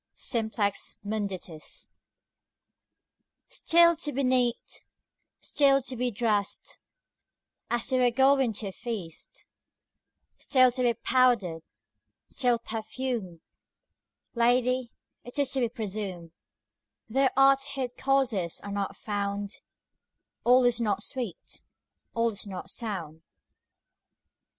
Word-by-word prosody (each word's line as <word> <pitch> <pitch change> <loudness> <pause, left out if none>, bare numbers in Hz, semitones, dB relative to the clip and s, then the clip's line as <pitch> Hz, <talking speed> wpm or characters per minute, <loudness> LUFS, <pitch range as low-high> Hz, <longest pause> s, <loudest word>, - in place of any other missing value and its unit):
Simplex 220 -4 0
Munditiis 195 -6 -3 1.6
STILL 340 -8 +4
to 300 -2 -1
be 275 0 -1
neat, 250 -2 0 0.6
still 275 -2 +3
to 255 0 -2
be 250 +1 0
drest, 210 -3 -1 0.9
As 240 +2 0
you 255 -1 +3
were 245 - +5
going 265 0 +3
to 210 0 -3
a - - -8
feast; 190 -7 -7 0.9
Still 255 -2 +4
to 255 +1 -3
be 240 -2 +2
powder'd, 235 -9 +2 0.7
still 245 -3 +2
perfumed: 220 -5 -4 0.9
Lady, 245 +1 +2 0.3
it 245 - -7
is 285 -2 +2
to 270 - 0
be 240 -2 +1
presumed, 200 -7 -4 0.8
Though 265 +3 +2
art's 275 +1 +4
hid 255 -2 -3
causes 250 -11 0
are 205 - -6
not 200 -1 -3
found, 200 -1 -3
5 - - -15 0.9
All 250 +1 +6
is 240 -1 +3
not 205 -2 0
sweet, 240 -8 -5 0.5
all 230 0 +2
is 205 -1 -3
not 185 -2 -6
sound. 175 -9 -4
235 Hz, 110 wpm, -28 LUFS, 205-255 Hz, 1.6 s, All